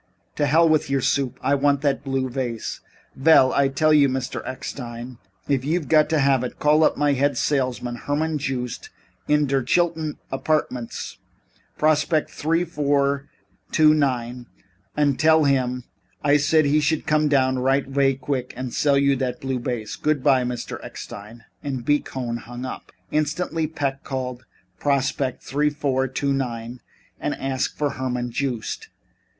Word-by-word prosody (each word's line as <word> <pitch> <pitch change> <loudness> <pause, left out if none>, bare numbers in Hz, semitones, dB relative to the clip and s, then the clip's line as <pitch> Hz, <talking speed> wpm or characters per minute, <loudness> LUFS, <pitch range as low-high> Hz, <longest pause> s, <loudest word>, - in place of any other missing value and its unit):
"To 145 - +2
hell 165 +4 +5
with 155 -2 +2
your 135 -1 +1
soup. 135 -1 0
I 135 +2 +2
want 140 0 +2
that 140 -1 0
blue 135 -1 -1
vase." 125 -3 -4 0.4
"Vell, 135 -2 +5
I 140 -1 +3
tell 155 +3 +2
you, 145 -2 +5
Mr. 130 -1 -3
Eckstein, 120 -2 -7 0.3
if 135 -3 +1
you 160 +6 +1
got 155 0 +3
to 160 - +2
have 135 -3 +3
it, 125 - -5
call 150 +1 +4
up - - +3
my 145 -1 +2
head 140 +2 +1
salesman, 125 -4 -1
Herman 150 +4 -1
Joost, 130 -4 -4 0.4
in 150 0 +3
der 135 -1 +1
Chilton 160 +3 0 0.2
Apardments 135 -4 -2 0.6
Prospect 155 0 +2
three 165 +3 0
two 170 - -20
four 140 -2 +1 0.5
nine, 130 -6 +2 0.5
und 145 -3 +2
tell 160 0 +5
him 125 -3 +1 0.4
I 145 0 +4
said 155 +1 +3
he 145 +2 +3
should 150 +1 0
come 155 0 +2
down 130 -3 +2
right 135 +2 +2
avay 135 0 +2
qvick 130 -1 -3
und 130 -1 -5
sell 140 -2 +3
you 140 0 +3
dot 125 -1 -2
blue 130 -1 -2
vase. 120 -3 -4
Goodbye, 140 -3 +2
Mr. 125 -1 -5
Eckstein." 110 +3 -9 0.2
And 135 -4 -4
B. 145 +1 +3
Cohn 120 -4 -4
hung 120 +2 -8
up. 130 - -7 0.2
Instantly 155 +1 -1
Peck 140 -3 -3
called 125 -2 -5 0.3
Prospect 135 -2 0
3249 135 -4 -1 0.4
and - - -2
asked 135 -1 -2
for 145 -1 0
Herman 125 -2 -3
Joost. 125 -3 -3
140 Hz, 150 wpm, -23 LUFS, 130-150 Hz, 0.6 s, hell